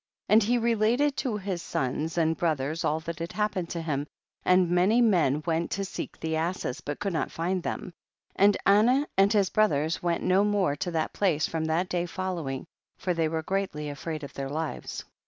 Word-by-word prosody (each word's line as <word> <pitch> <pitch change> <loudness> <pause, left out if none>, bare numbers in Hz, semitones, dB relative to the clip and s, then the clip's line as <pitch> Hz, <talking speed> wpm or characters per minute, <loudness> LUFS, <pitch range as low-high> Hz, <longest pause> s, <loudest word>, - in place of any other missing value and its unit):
3.5. - - +6
And 220 - +7
he 240 +4 +2
related 235 +5 +2
to 235 -5 -1
his 190 -3 -3
sons 150 +5 -2
and 165 -1 +2
brothers 155 -1 -1
all 155 +1 +1
that 165 0 -6
had 165 +1 -5
happened 205 -5 -1
to 170 -1 -4
him, 145 -2 -2 0.4
and 180 -1 +4
many 180 +7 +3
men 170 - +3
went 165 0 0
to 195 0 -2
seek - - -6
the 160 0 -2
asses 160 -4 -2
but 145 -1 -4
could 200 -3 -2
not 160 - -1
find 180 +3 -1
them, 180 +1 -4 0.4
and 200 +1 +5
Anah 235 +8 +5
and 195 +1 +4
his 200 -4 +2
brothers 160 -7 +2
went 170 -1 0
no 190 +2 +4
more 205 -8 +1
to 175 - -3
that 160 -2 -1
place 170 -7 +1
from 160 -1 -2
that 165 +3 0
day 175 -1 -1
following, 170 -8 -4 0.3
for 180 - -1
they 165 -2 +1
were 160 0 -2
greatly 185 -6 -2
afraid 155 +1 -5
of 140 - -8
their 135 0 -4
lives. 155 +2 -4
175 Hz, 200 wpm, -27 LUFS, 160-200 Hz, 0.4 s, And